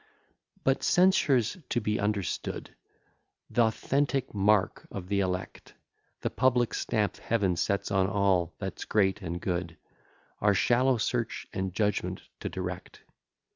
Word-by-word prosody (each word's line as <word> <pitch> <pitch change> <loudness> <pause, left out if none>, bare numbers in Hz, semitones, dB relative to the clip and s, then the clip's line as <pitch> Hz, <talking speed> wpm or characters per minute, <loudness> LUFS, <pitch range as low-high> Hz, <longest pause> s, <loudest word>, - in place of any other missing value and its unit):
IV - - -32
But 135 0 +2
censure's 145 - +3
to 120 - +1
be 105 -1 -1
understood 100 -5 -2 0.8
Th'authentic 130 +4 +1
mark 100 -1 +2
of 95 -2 -7
the 100 -1 +1
elect, 90 -1 -3 0.5
The - - -1
public 125 -3 +2
stamp 105 -2 0
Heaven 100 -6 0
sets 100 +3 -1
on 95 -1 +3
all 95 -4 +1
that's - - -5
great 100 -1 +2
and 85 -1 -4
good, 85 -2 -3 0.6
Our 105 -1 +3
shallow 125 +5 +3
search 115 +1 -2
and 95 -1 -2
judgment 105 +2 -1 0.2
to - - -4
direct. 90 -1 -6
105 Hz, 130 wpm, -29 LUFS, 95-120 Hz, 0.8 s, censure's